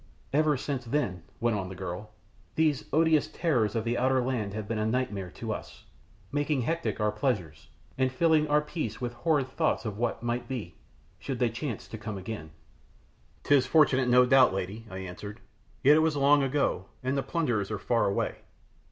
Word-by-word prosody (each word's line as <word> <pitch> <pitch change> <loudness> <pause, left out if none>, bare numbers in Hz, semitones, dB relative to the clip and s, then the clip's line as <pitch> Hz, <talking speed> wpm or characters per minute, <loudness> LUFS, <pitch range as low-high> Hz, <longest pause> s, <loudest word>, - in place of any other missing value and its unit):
"Ever 150 0 +3
since 135 -1 -3
then," 115 - -1 0.2
went 120 -1 +1
on 95 -3 -3
the 95 - -7
girl, 90 +4 -6 0.5
"these 155 -4 +2
odious 160 -1 +3
terrors 125 -11 0
of 115 - 0
the 120 +1 -1
outer 130 +1 +3
land 120 -6 -2
have 110 -2 -4
been 115 -1 -2
a 110 - 0
nightmare 110 -6 -1
to - - -3
us, - - -9 0.5
making 145 -1 0
hectic 165 +4 -2
our 105 0 +2
pleasures, 90 - -2 0.3
and 130 0 +2
filling 155 +2 +3
our 150 0 +3
peace 155 +2 -4
with 120 -2 -3
horrid 145 +1 +1
thoughts 145 -1 0
of 105 -1 -4
what 120 -1 -1
might 120 0 -2
be, 115 -10 -5 0.5
should 135 +2 -4
they 120 -1 +1
chance 115 -1 -5
to 110 - -8
come 105 -1 -5
again." 95 -4 -6 0.9
"'Tis 140 -3 +4
unfortunate, 135 -3 +4
no 125 +1 +6
doubt, 130 -5 +5
lady," 100 +4 -5
I 95 - -7
answered. 95 +3 -7 0.4
"Yet 145 +3 +7
it - - +5
was 160 -1 +2
long 140 +1 +5
ago, 140 +1 0 0.2
and 130 +2 0
the 135 - +1
plunderers 125 - -1
are - - -2
far 120 -1 +1
away. 100 - -1
125 Hz, 185 wpm, -28 LUFS, 105-145 Hz, 0.9 s, Yet